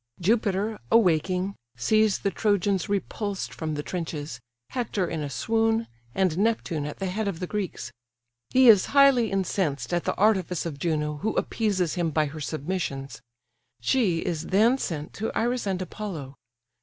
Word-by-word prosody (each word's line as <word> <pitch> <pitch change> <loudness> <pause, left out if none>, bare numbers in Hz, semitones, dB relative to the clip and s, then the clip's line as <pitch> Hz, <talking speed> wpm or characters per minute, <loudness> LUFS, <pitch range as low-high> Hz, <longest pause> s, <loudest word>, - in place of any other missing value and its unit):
Jupiter, 210 +1 +1
awaking, 185 -2 +3 0.2
sees 215 - +3
the 200 - -1
Trojans 200 -3 +1
repulsed 205 0 -2
from 155 -2 -3
the 150 - -3
trenches, 160 -6 -5 0.3
Hector 210 -7 -1
in 160 -2 -3
a 145 - -3
swoon, 225 - +1 0.3
and 185 -3 +1
Neptune 195 -9 0
at 150 - -7
the 195 - -3
head 200 +3 -2
of 185 -5 -3
the 180 - -2
Greeks: 180 - -4 0.6
he 260 0 +5
is 210 -5 +7
highly 265 -5 +6
incensed 170 -9 -1
at 175 - 0
the - - 0
artifice 190 -5 +2
of 150 -4 -5
Juno, 150 -2 -1
who 215 +8 -2
appeases 195 -7 0
him 175 -2 0
by 155 0 +1
her 155 +2 -7
submissions; 140 -5 -4 0.6
she 180 - +2
is 165 -2 -2
then 225 +7 +4
sent 155 - -4
to 220 +2 -3
Iris 240 -1 0
and 190 -2 0
Apollo. 180 -8 -6
185 Hz, 155 wpm, -26 LUFS, 155-215 Hz, 0.6 s, is